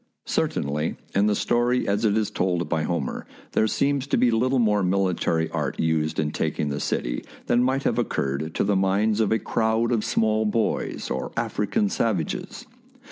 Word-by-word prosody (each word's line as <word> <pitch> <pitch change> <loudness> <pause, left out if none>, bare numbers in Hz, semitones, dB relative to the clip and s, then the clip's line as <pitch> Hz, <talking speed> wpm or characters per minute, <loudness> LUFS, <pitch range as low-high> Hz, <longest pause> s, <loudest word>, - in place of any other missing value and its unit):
Certainly, 75 +3 -1 0.2
in 100 +2 +3
the 105 - +2
story 120 +3 +1
as 105 +3 +1
it 105 0 +3
is 105 -1 0
told 90 -4 0
by 80 -2 0
Homer, 75 -4 -3 0.2
there 110 - +2
seems 140 +3 0
to - - +1
be 125 - +4
little 130 +4 +2
more 105 -4 +3
military 90 -3 +1
art - - -2
used 80 -1 0
in 75 -1 0
taking 75 - -1
the 70 0 -2
city - - -2 0.2
than 120 - +3
might 130 +2 +1
have 115 - +1
occurred 80 - -2
to - - +1
the 100 0 +1
minds 100 +3 +2
of 110 -3 +2
a 110 - +4
crowd 110 +1 0
of 115 -3 +1
small 110 -2 +1
boys 110 +1 -1
or - - -3
African 205 - 0
savages. 110 - -2
105 Hz, 180 wpm, -24 LUFS, 85-115 Hz, 0.2 s, be